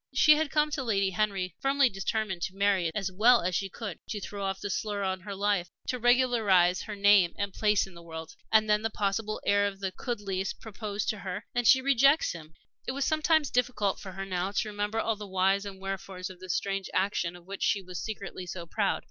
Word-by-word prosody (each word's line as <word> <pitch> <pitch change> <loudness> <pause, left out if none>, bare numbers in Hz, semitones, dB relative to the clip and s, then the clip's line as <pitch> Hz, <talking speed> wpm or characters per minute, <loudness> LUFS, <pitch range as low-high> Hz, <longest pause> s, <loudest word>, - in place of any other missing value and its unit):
She 305 +3 +7
had 310 -1 0
come 300 +1 +1
to 295 -2 -2
Lady 200 -5 +1
Henry 190 -2 -1
firmly 275 0 +3
determined 195 -2 -2
to 190 - -3
marry 200 -2 +2
as - - +1
soon - - -12
and 210 - 0
as 190 -1 -3
well 240 +2 +6
as 180 +1 -1
she 195 +2 -1
could 205 -3 -7
to 210 - -3
throw 200 0 -6
off 195 0 -2
the 205 - -4
slur 205 -2 -2
on 190 -1 -1
her 200 +2 -7
life 200 -3 0 0.2
to 250 - -1
regularize 225 -8 +4
her 215 - -6
name 200 -3 +5
and 200 -2 -2
place 210 -2 +2
in 190 - -14
the 170 - -12
world. 160 -1 -8 0.2
And 220 0 +5
then 210 0 +3
the 225 - -1
possible 215 +1 -2
heir 205 0 +3
of 195 -1 -6
the 195 -1 -2
Chudleighs 195 -4 -3
proposes 210 -1 -5
to 215 - -2
her 195 +2 -5
and 240 -1 +1
she 260 - +7
rejects 275 +3 +4
him! 160 -2 -10 0.3
It - - -1
was 275 0 -1
sometimes 310 -1 +2
difficult 230 -5 0
for 190 -2 -8
her 195 +1 -5
now 185 0 -2
to 215 - 0
remember 205 +2 -2
all 225 0 0
the 210 0 -8
whys 195 +1 +1
and 195 -1 -8
wherefores 190 -1 -5
of 180 - -14
this 185 -1 -3
strange 195 -1 -2
action 185 -3 0
of 175 -1 -14
which 200 +1 -8
she 195 - +1
was 180 -1 -6
secretly 200 -4 -6
so 170 -1 -6
proud. 165 - 0
200 Hz, 235 wpm, -29 LUFS, 190-220 Hz, 0.3 s, She